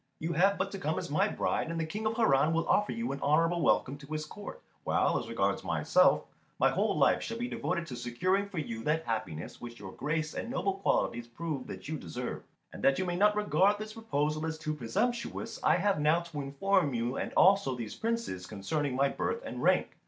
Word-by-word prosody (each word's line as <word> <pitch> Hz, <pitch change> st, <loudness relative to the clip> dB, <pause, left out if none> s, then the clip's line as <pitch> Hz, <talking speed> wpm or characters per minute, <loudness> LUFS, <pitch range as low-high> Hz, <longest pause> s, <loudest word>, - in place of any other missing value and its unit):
You 165 Hz, +2 st, -2 dB
have 195 Hz, +5 st, +3 dB
but 195 Hz, +1 st, -1 dB
to 195 Hz, -, -5 dB
come 155 Hz, -2 st, -1 dB
as -, -, -4 dB
my 190 Hz, +7 st, +3 dB
bride, 185 Hz, -, -1 dB
and 165 Hz, 0 st, -3 dB
the 160 Hz, -, 0 dB
King 210 Hz, +7 st, -3 dB
of 220 Hz, -, -1 dB
Harran 155 Hz, -, +4 dB
will 165 Hz, 0 st, 0 dB
offer 210 Hz, -, +3 dB
you 230 Hz, +1 st, -2 dB
an 140 Hz, -, -5 dB
honourable 165 Hz, +4 st, +3 dB
welcome 140 Hz, -2 st, +2 dB
to 140 Hz, -, -12 dB
his 155 Hz, 0 st, -2 dB
court; 205 Hz, -, -9 dB, 0.2 s
while, -, -, +2 dB
as -, -, -7 dB
regards -, -, 0 dB
myself, -, -, +3 dB, 0.3 s
my -, -, +4 dB
whole -, -, +1 dB
life -, -, +4 dB
shall 230 Hz, -, -4 dB
be 240 Hz, +1 st, -2 dB
devoted 180 Hz, -7 st, -2 dB
to 130 Hz, -, -7 dB
securing 185 Hz, +12 st, 0 dB
for 195 Hz, -, -8 dB
you 115 Hz, -7 st, -4 dB
that 160 Hz, +2 st, +1 dB
happiness 110 Hz, -9 st, -4 dB
which 120 Hz, -1 st, -8 dB
your 95 Hz, -2 st, -8 dB
grace 155 Hz, +5 st, -2 dB
and -, -, -4 dB
noble 200 Hz, -6 st, 0 dB
qualities 120 Hz, -10 st, 0 dB
prove 140 Hz, +2 st, -5 dB
that -, -, -8 dB
you 155 Hz, -1 st, -3 dB
deserve. 80 Hz, -, -5 dB, 0.3 s
And -, -, -9 dB
that 135 Hz, 0 st, +4 dB
you 185 Hz, -, 0 dB
may 175 Hz, -1 st, -1 dB
not 210 Hz, +3 st, +4 dB
regard 205 Hz, -1 st, +3 dB
this 215 Hz, +1 st, -7 dB
proposal 155 Hz, -9 st, -1 dB
as 160 Hz, 0 st, -3 dB
too 155 Hz, 0 st, -3 dB
presumptuous, 155 Hz, -, -2 dB
I -, -, +5 dB
have 195 Hz, 0 st, +1 dB
now 155 Hz, +3 st, +3 dB
to 165 Hz, -4 st, -6 dB
inform 145 Hz, +1 st, +1 dB
you, 120 Hz, +2 st, -1 dB
and -, -, -3 dB
also 190 Hz, -8 st, +5 dB
these 115 Hz, -3 st, -5 dB
Princes, 225 Hz, -, -3 dB
concerning 125 Hz, +7 st, -2 dB
my 140 Hz, +2 st, +3 dB
birth 465 Hz, -, -2 dB
and -, -, -5 dB
rank. -, -, +3 dB
160 Hz, 220 wpm, -31 LUFS, 135-195 Hz, 0.3 s, I